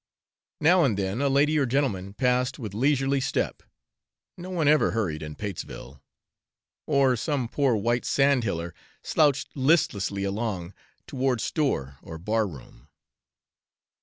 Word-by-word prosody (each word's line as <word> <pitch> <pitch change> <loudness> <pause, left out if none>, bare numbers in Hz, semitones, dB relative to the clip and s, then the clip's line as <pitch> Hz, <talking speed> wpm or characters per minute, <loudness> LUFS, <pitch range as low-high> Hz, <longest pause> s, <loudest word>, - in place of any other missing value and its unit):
Now 175 +3 +5
and 115 -9 +1
then 100 +5 -2
a 140 - +2
lady 145 +3 +3
or 135 - +1
gentleman 105 -8 -1
passed 125 +1 +1
with 110 -8 -6
leisurely 135 +3 +1
step 135 - -2 0.7
no 180 +1 -9
one 170 -5 0
ever 150 +1 +4
hurried 90 -9 -2
in 75 -1 -7
Patesville 85 -8 -7 0.9
or 140 -4 +3
some 135 0 -2
poor 135 0 +1
white 120 +3 0
sandhiller 115 -12 +1 0.3
slouched 140 -5 +1
listlessly 130 - +1
along 100 -3 -3 0.3
toward 130 -2 -1
store 70 - -1
or 80 - -9
bar 105 +5 0
room. 65 -7 -13
125 Hz, 130 wpm, -26 LUFS, 100-140 Hz, 0.9 s, Now